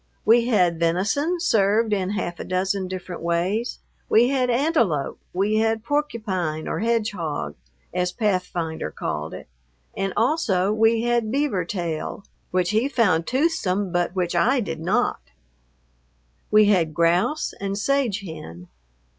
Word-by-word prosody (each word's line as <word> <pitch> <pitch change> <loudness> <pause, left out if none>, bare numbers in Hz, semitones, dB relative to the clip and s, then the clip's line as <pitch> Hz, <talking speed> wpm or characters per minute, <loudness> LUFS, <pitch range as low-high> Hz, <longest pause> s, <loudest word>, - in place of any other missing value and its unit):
We 235 +1 +5
had 180 -8 +2
venison 215 - +1
served 220 - +2
in 190 -2 0
half 175 -4 -3
a - - -4
dozen 190 +1 -1
different 185 -1 -6
ways. 180 +8 -1 0.3
We 235 +3 +5
had 260 -2 +1
antelope; 235 - +1
we 200 +4 +1
had 225 0 +1
porcupine, 215 - -2
or - - -2
hedgehog, 210 -9 -1 0.4
as 180 0 0
Pathfinder 180 -6 -2
called 75 +1 -4
it; - - -10 0.5
and 195 0 -1
also 215 - +2
we 225 +1 +3
had 240 -2 +1
beaver 265 - 0
tail, 170 +1 -4 0.2
which 180 -1 +1
he 225 +6 +1
found 190 - +2
toothsome, 230 - 0
but 175 +1 0
which 180 -2 -1
I 250 +10 +3
did 165 -8 -4
not. 195 - 0 1.3
We 215 0 +6
had 170 -7 +2
grouse 175 - +1
and 200 0 -2
sage 235 -2 0
hen. 90 - -9
200 Hz, 135 wpm, -23 LUFS, 175-235 Hz, 1.3 s, We